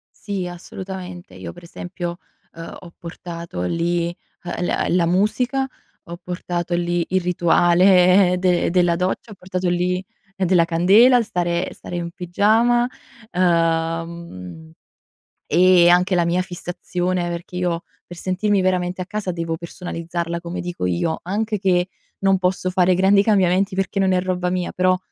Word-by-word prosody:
Sì 195 -3 -4
assolutamente. 180 +1 -8
Io - - -8
per 175 - -14
esempio, 175 0 -6 0.4
uhm, 165 0 -9
ho 175 -2 -13
portato 170 - -7
lì, 170 - -1 0.3
uhm, 175 0 -3
la - - 0
la 175 -1 +3
musica, 240 +9 +1 0.4
ho 170 +1 -8
portato 175 -1 -3
lì 175 0 0
il 185 0 +1
rituale 180 +1 +4
de 180 -1 +2
della 175 -1 +3
doccia, 185 +5 -2
ho - - -9
portato 185 -1 -3
lì 180 +1 0 0.3
della 185 -3 +3
candela, 200 +10 +5
stare 175 -4 -1
stare - - -8
in 170 -1 -4
pigiama, 220 +7 +2 0.4
ehm, 165 - -1 0.7
e 180 -1 +5
anche 180 +2 +4
la 175 -1 +2
mia 175 +2 +1
fissazione 180 0 -3
perché 170 +1 -6
io, 175 -2 -1 0.2
per 175 - -11
sentirmi 190 +3 0
veramente 185 0 0
a - - -4
casa 205 -1 -3
devo 165 -1 -3
personalizzarla 170 0 -5
come 175 +1 -5
dico 175 - -4
io, 90 - -1
anche 210 +4 -1
che 180 -2 +2 0.3
non 195 0 +3
posso 185 0 0
fare 180 0 +3
grandi 195 +2 +4
cambiamenti 195 -2 +2
perché 195 +1 -1
non 190 -1 +3
è 180 - +2
roba 180 -1 -1
mia 180 -1 -2
però, 185 0 +2
180 Hz, 145 wpm, -21 LUFS, 170-185 Hz, 0.7 s, candela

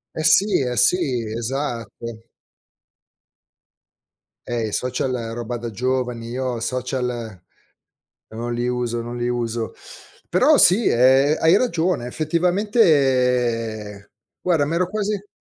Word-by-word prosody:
Eh 155 - -3
sì, 200 +5 +4
eh 125 -1 -2
sì, 180 - +4 0.4
esatto. 115 -2 -5 2.2
Eh, 115 -2 -2
i - - -6
social, 125 +1 -1 0.2
roba 120 0 -4
da 120 0 -5
giovani, 125 0 -2
io 125 -1 -3
social 125 -3 -3 0.9
non 120 +2 -5
li 120 +1 -2
uso, 120 -1 -2
non 120 +1 -6
li 120 0 -2
uso. 115 -2 -2 0.6
Però - - +4
sì, 200 +6 +5
ehm, 135 +5 +4
hai 165 +4 +5
ragione 175 - 0
effettivamente 125 - +1 0.3
guarda, 170 -5 +2
m'ero 170 +4 0
quasi 205 0 -3
125 Hz, 110 wpm, -21 LUFS, 120-155 Hz, 2.2 s, sì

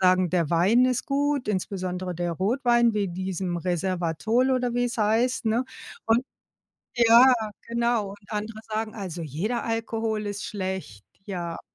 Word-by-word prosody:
sagen: 185 -1 +4
„Der 170 -4 +1
Wein 195 +9 +4
ist 255 -1 0
gut, 285 -3 0
insbesondere 185 -2 -2
der 175 0 -2
Rotwein, 235 - +2
wie 205 -3 0
diesem 185 0 -3
Resveratrol“ 185 +7 0
oder 250 -2 0
wie‘s 245 0 -1
heißt, 225 +3 +1
ne? 230 +4 +2 0.4
Und 230 +3 +3 0.7
ja, 240 +2 +7 0.4
genau, 235 -3 0
und 200 - -11
andere 215 +1 -4 0.2
sagen, 220 0 -2
also 180 -4 -5
jeder 175 - -2
Alkohol 225 -1 -2
ist 205 0 -4
schlecht, 190 - -5 0.2
ja. 175 -4 -4
210 Hz, 140 wpm, -26 LUFS, 185-235 Hz, 0.7 s, ja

